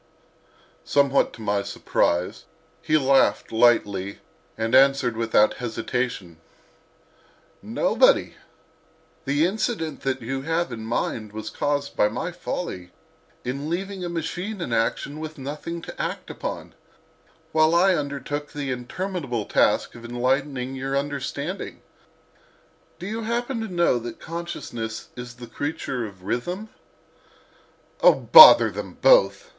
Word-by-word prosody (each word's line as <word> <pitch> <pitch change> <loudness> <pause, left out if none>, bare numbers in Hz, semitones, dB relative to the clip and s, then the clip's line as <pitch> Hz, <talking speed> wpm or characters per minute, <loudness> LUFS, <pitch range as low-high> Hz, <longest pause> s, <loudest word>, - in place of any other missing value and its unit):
Somewhat 140 -1 +2
to 115 - -10
my 100 -1 0
surprise 90 -2 -1 0.4
he 155 - +2
laughed 135 -2 +2
lightly 105 -4 +2 0.4
and 115 +1 -2
answered 135 -2 +4
without 110 -2 +2
hesitation: 120 -7 -3 1.2
"Nobody; - - +2 0.9
the 145 +4 +2
incident 190 -4 -2
that 130 -2 -2
you 135 +3 -3
have 165 +1 -1
in 115 -2 -6
mind 110 -2 -3
was 110 0 -6
caused 145 -1 -2
by 105 - +3
my 165 +11 -4
folly 95 - -5 0.6
in 140 +4 -4
leaving 190 +2 -4
a 175 - -3
machine 180 +5 -4
in 170 -9 -3
action 115 +6 -1
with 155 0 -7
nothing 150 +5 -6
to - - -7
act - - -4
upon, - - -6 0.8
while 155 +1 +3
I 185 +2 +5
undertook 145 -1 -4
the 140 -2 -3
interminable 130 - -4
task - - +2
of 120 - -12
enlightening 130 +2 -1
your 135 +1 -2
understanding. 145 +4 -4 1.1
Do 175 - -8
you 220 +3 -4
happen 235 +2 -2
to 225 - -3
know 175 - +1
that 120 0 -8
Consciousness 120 -10 -6
is 125 -1 -8
the 120 0 -10
creature 130 -2 -4
of 95 -3 -15
Rhythm?" 180 - -3 1.3
"O - - +7
bother - - +9
them - - -7
both!" - - +4
140 Hz, 125 wpm, -24 LUFS, 120-170 Hz, 1.3 s, bother